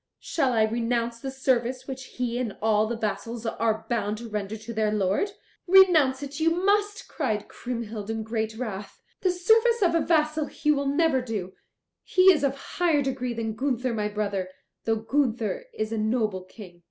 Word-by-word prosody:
"Shall 275 Hz, -6 st, 0 dB
I 220 Hz, -2 st, +4 dB
renounce 235 Hz, +1 st, -1 dB
the 270 Hz, -, -5 dB
service 260 Hz, -2 st, 0 dB
which 265 Hz, -1 st, -6 dB
he 245 Hz, -1 st, -3 dB
and 235 Hz, -5 st, -3 dB
all 215 Hz, 0 st, +2 dB
the 235 Hz, -, -2 dB
vassals 230 Hz, +2 st, -3 dB
are 220 Hz, -1 st, -1 dB
bound 215 Hz, -2 st, -1 dB
to 235 Hz, +1 st, -7 dB
render 210 Hz, 0 st, -3 dB
to 225 Hz, +2 st, -8 dB
their 215 Hz, -1 st, +1 dB
lord?" 210 Hz, -, 0 dB, 0.3 s
"Renounce 325 Hz, -8 st, +6 dB
it 285 Hz, +1 st, -6 dB
you 320 Hz, +1 st, +4 dB
must," 410 Hz, +5 st, +1 dB
cried 215 Hz, -9 st, -2 dB
Kriemhild 230 Hz, -4 st, -5 dB
in 225 Hz, 0 st, -2 dB
great 220 Hz, 0 st, -2 dB
wrath. 210 Hz, -5 st, -6 dB, 0.2 s
"The 375 Hz, -, +1 dB
service 445 Hz, +5 st, +3 dB
of 340 Hz, -2 st, +3 dB
a 330 Hz, -, +3 dB
vassal 310 Hz, -2 st, +1 dB
he 300 Hz, -, 0 dB
will 280 Hz, -1 st, 0 dB
never 285 Hz, -1 st, +2 dB
do; 210 Hz, -6 st, -4 dB, 0.5 s
he 375 Hz, +1 st, +6 dB
is 300 Hz, -4 st, -1 dB
of 275 Hz, -1 st, +1 dB
higher 310 Hz, +1 st, 0 dB
degree 255 Hz, -2 st, -2 dB
than 225 Hz, -1 st, -2 dB
Gunther 255 Hz, 0 st, -1 dB
my 210 Hz, -2 st, -1 dB
brother, 200 Hz, -3 st, -2 dB, 0.4 s
though 225 Hz, -, +2 dB
Gunther 240 Hz, -, -1 dB
is 215 Hz, -, -3 dB
a 225 Hz, -, -1 dB
noble 215 Hz, -4 st, 0 dB
King." 185 Hz, -3 st, -13 dB
235 Hz, 180 wpm, -26 LUFS, 220-290 Hz, 0.5 s, Renounce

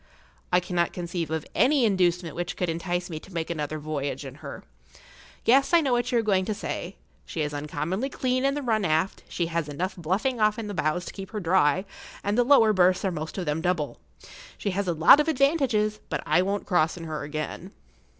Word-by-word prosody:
I 180 Hz, -, +5 dB
cannot 175 Hz, -1 st, -1 dB
conceive 170 Hz, -2 st, -4 dB
of 160 Hz, 0 st, -2 dB
any 270 Hz, -2 st, +4 dB
inducement 180 Hz, -5 st, +1 dB
which 175 Hz, 0 st, -4 dB
could 180 Hz, -, -1 dB
entice 175 Hz, +2 st, -2 dB
me 160 Hz, -3 st, -6 dB
to 190 Hz, -, -15 dB
make 165 Hz, 0 st, -2 dB
another 155 Hz, -1 st, -3 dB
voyage 145 Hz, -2 st, -4 dB
in 135 Hz, -, -7 dB
her. 140 Hz, -2 st, -8 dB, 0.8 s
Yes, 275 Hz, +7 st, +5 dB
I 335 Hz, -, +6 dB
know 275 Hz, -4 st, 0 dB
what 245 Hz, +1 st, +1 dB
you 245 Hz, -, +2 dB
are 230 Hz, -, +2 dB
going 195 Hz, -3 st, +2 dB
to 215 Hz, -, -2 dB
say. 190 Hz, -2 st, -5 dB, 0.3 s
She 160 Hz, -, -5 dB
is 150 Hz, 0 st, -3 dB
uncommonly 150 Hz, -, -3 dB
clean 255 Hz, -1 st, -1 dB
in 275 Hz, +1 st, +2 dB
the 290 Hz, -, -3 dB
run 220 Hz, -4 st, +1 dB
aft, 160 Hz, +2 st, 0 dB
she 175 Hz, -, -1 dB
has 165 Hz, -2 st, -2 dB
enough 185 Hz, +6 st, -3 dB
bluffing 200 Hz, -, -1 dB
off 215 Hz, 0 st, +3 dB
in 225 Hz, -, -4 dB
the 205 Hz, -, -5 dB
bows 165 Hz, 0 st, -1 dB
to -, -, -7 dB
keep 195 Hz, -1 st, -8 dB
her 215 Hz, -, -4 dB
dry, 180 Hz, -1 st, +2 dB, 0.4 s
and 205 Hz, +1 st, 0 dB
the 245 Hz, -, +4 dB
lower 235 Hz, -5 st, +5 dB
berths 185 Hz, 0 st, +3 dB
are 190 Hz, -, +1 dB
most 155 Hz, +1 st, -5 dB
of 185 Hz, -, -2 dB
them 150 Hz, +1 st, -1 dB
double. 175 Hz, -4 st, -1 dB, 0.6 s
She 200 Hz, -, -2 dB
has 195 Hz, +1 st, -2 dB
a 175 Hz, -, +1 dB
lot 165 Hz, -, +7 dB
of 300 Hz, -, +1 dB
advantages, 265 Hz, -8 st, +2 dB
but -, -, -2 dB
I 180 Hz, -, +3 dB
won't 200 Hz, +2 st, -2 dB
cross 175 Hz, -3 st, +1 dB
in 170 Hz, -, -7 dB
her 155 Hz, -2 st, -4 dB
again. 155 Hz, +5 st, -5 dB
180 Hz, 220 wpm, -26 LUFS, 160-215 Hz, 0.8 s, lot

